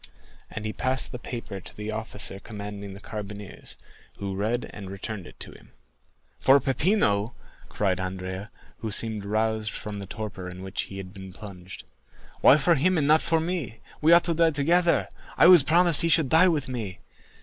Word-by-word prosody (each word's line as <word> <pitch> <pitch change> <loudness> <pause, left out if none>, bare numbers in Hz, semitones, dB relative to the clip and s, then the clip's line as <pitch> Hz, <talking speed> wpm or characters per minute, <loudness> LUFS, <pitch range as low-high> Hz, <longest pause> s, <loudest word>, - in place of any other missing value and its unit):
And 110 - -6
he 110 - -3
passed 130 0 -1
the 125 - -6
paper 115 -5 -6
to - - -14
the 105 +1 -4
officer 110 -3 -2
commanding 100 -2 -8
the - - -10
carbineers, 105 -1 -8 0.4
who 100 -1 -4
read 110 +5 -1
and 100 -3 -8
returned 100 0 -6
it - - -15
to - - -8
him. - - -18 0.7
"For 135 +2 +6
Peppino!" 130 - +1 0.3
cried 95 -3 0
Andrea, 95 +2 -5 0.3
who 110 - -4
seemed 110 -1 -1
roused 110 +1 0
from 105 -3 -6
the 100 - -7
torpor 95 -4 -6
in 90 +1 -9
which 95 -1 -3
he 95 - -8
had 95 -1 -8
been 95 -2 -10
plunged. 95 -2 -10 0.6
"Why 140 - +7
for 160 +4 +3
him 175 +5 +2
and 150 - +1
not 155 +2 +5
for 165 -1 +1
me? 160 - -3 0.2
We 155 +2 +4
ought 170 0 +7
to 170 - 0
die 165 0 +4
together. 170 +4 +2 0.3
I - - +6
was 175 -2 +9
promised 170 +3 +4
he 165 - +1
should 160 -4 +3
die 165 +6 +6
with 155 -6 0
me. 115 -8 -5
110 Hz, 185 wpm, -26 LUFS, 100-150 Hz, 0.7 s, was